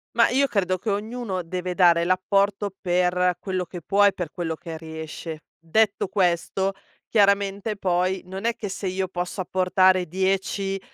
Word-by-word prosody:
Mah, 230 - +5
io 270 +3 +3
credo 185 -6 0
che 210 +4 -2
ognuno 210 -1 -3
deve 180 +1 -4
dare 170 -2 +5
l'apporto, 195 +2 +1
per 180 0 +1
quello 185 -2 -2
che 175 0 -9
può, 205 +5 +3
e 200 - +4
per 175 -4 -4
quello 165 -2 -3
che 160 0 -7
riesce. 160 0 -7 0.2
Detto 200 +5 +1
questo, 190 0 0 0.4
chiaramente 200 0 +2
poi, 185 0 0
non 190 +4 -7
è 235 - +2
che 205 - -5
se 195 +1 -5
io 190 0 -1
posso 180 +1 -4
apportare 185 0 +3
10, 195 +2 -1
185 Hz, 160 wpm, -24 LUFS, 180-200 Hz, 0.4 s, Mah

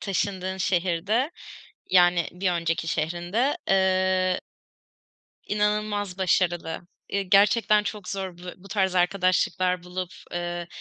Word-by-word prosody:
taşındığın 190 -1 -2
şehirde, 190 - 0 0.6
yani 175 -2 +4
bir 185 +1 -1
önceki 165 -1 -1
şehrinde, 175 - 0
eee, 185 -1 +2 1.1
inanılmaz 210 -2 -1
başarılı. 175 -2 0 0.3
Eee, 200 0 -1
gerçekten 210 +2 +4
çok 205 -3 -5
zor 190 -3 -4
bu 175 - -14
bu 195 +2 -15
tarz 190 -2 0
arkadaşlıklar 180 0 +1
bulup, 180 0 -5 0.2
eee, 175 0 -4
185 Hz, 105 wpm, -25 LUFS, 175-200 Hz, 1.1 s, yani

